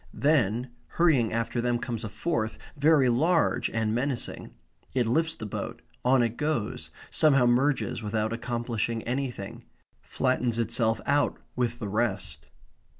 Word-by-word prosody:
Then, 125 -5 +2 0.3
hurrying 150 -10 +4
after 115 +1 -1
them 120 0 +1
comes 120 -1 -4
a 110 - -4
fourth, 110 0 -2 0.2
very 145 -2 +4
large 160 +8 +2
and 110 -1 0
menacing; 125 +1 -2 0.5
it 125 -2 +3
lifts 160 +7 +1
the 110 - -7
boat; 105 - -5 0.2
on 125 0 +4
it 115 0 -2
goes; 150 -8 -2 0.2
somehow 140 -5 +4
merges 120 -3 +2
without 110 +1 -1
accomplishing 115 -1 -2
anything; 125 -5 -4 0.4
flattens 125 -3 0
itself 115 0 +1
out 145 +1 +2 0.2
with 120 -1 0
the 110 - -4
rest. 110 +3 -2
120 Hz, 135 wpm, -27 LUFS, 115-140 Hz, 0.5 s, hurrying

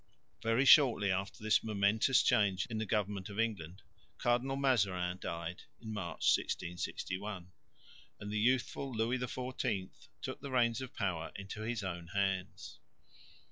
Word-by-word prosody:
Very 115 +4 +2
shortly 120 -8 +6
after 95 +3 -3
this 110 - +3
momentous 110 +4 +3
change 100 -5 +3
in 110 - -2
the 110 - -2
government 100 -2 -1
of 100 +1 -6
England, 100 -5 -2 0.3
Cardinal 125 +3 +1
Mazarin 95 -10 +1
died 85 +1 -5 0.2
(March, 105 -6 -5
1661); 95 +2 -4 0.7
and 100 0 -6
the 105 - 0
youthful 130 +3 +1
Louis 115 +2 0
XIV 125 -5 -3 0.3
took - - -5
the 140 - -6
reins 120 -2 +2
of 130 - -8
power 90 -6 -2
into 100 +2 -7
his 110 -1 -2
own 85 -3 -5
hands. 95 -2 -2
105 Hz, 135 wpm, -34 LUFS, 95-120 Hz, 0.7 s, shortly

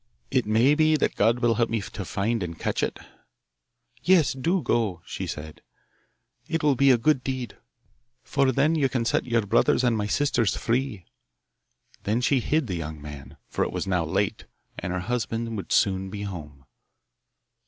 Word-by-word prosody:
It - - +1
may 115 +6 +4
be 155 +1 +4
that 150 - 0
God 120 +2 +2
will 120 -1 +3
help 115 +1 +1
me 115 - 0
to 100 0 -6
find 105 +5 -1
and 85 -2 -4
catch - - -1
it.' - - -1 1.0
'Yes, 175 -6 +4
do 165 +7 0
go,' 100 -8 0
she - - -5
said; 75 0 -7 0.9
'it 165 -1 -2
will 145 -2 +4
be 140 +1 +4
a 125 - +6
good 130 +2 +2
deed, 130 -4 -4 0.7
for 135 -1 +2
then 140 +5 +2
you 145 -5 +2
can 125 -3 -1
set 115 - 0
your 115 -3 +1
brothers 115 +4 +3
and 120 -2 +3
my 105 -1 -1
sisters 120 -4 +1
free.' 120 -6 -1 1.0
Then 110 +4 0
she 130 +2 +2
hid 150 +5 +1
the 100 - -4
young 80 -2 -5
man, 75 -2 -10
for - - -1
it - - -2
was - - -3
now 90 -3 +1
late, 80 - -1 0.3
and 90 +1 -4
her 90 0 -2
husband 115 +1 -2
would 95 -5 -6
soon 95 -1 +2
be 100 +1 -6
home. 75 -8 -8
115 Hz, 180 wpm, -26 LUFS, 95-135 Hz, 1.0 s, a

